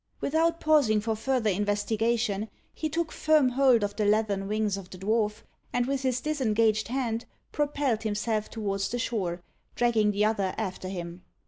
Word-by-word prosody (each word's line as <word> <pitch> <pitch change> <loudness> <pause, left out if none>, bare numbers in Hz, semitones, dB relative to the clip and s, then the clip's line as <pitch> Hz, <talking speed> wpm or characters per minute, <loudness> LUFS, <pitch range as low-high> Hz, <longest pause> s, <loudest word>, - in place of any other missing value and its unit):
Without 330 +3 +1
pausing 285 -9 +4
for 220 +1 -1
further 225 -1 0
investigation, 210 +2 0 0.2
he 310 - -3
took 330 +1 -2
firm 305 -4 +3
hold 250 -3 +4
of 205 0 -2
the 215 - 0
leathern 205 -2 +1
wings 210 -1 0
of 195 -2 -8
the 185 - -10
dwarf, 210 +2 0 0.3
and 245 0 +1
with 275 +1 -1
his 255 -2 0
disengaged 225 -8 +1
hand 235 -2 -2 0.3
propelled 285 -6 0
himself 215 0 -1
towards 195 -3 -2
the 245 - -2
shore, 185 -7 -2 0.3
dragging 230 -3 +3
the 210 +1 +2
other 200 -4 0
after 190 -3 -4
him. 175 -1 -6
220 Hz, 160 wpm, -28 LUFS, 205-250 Hz, 0.3 s, pausing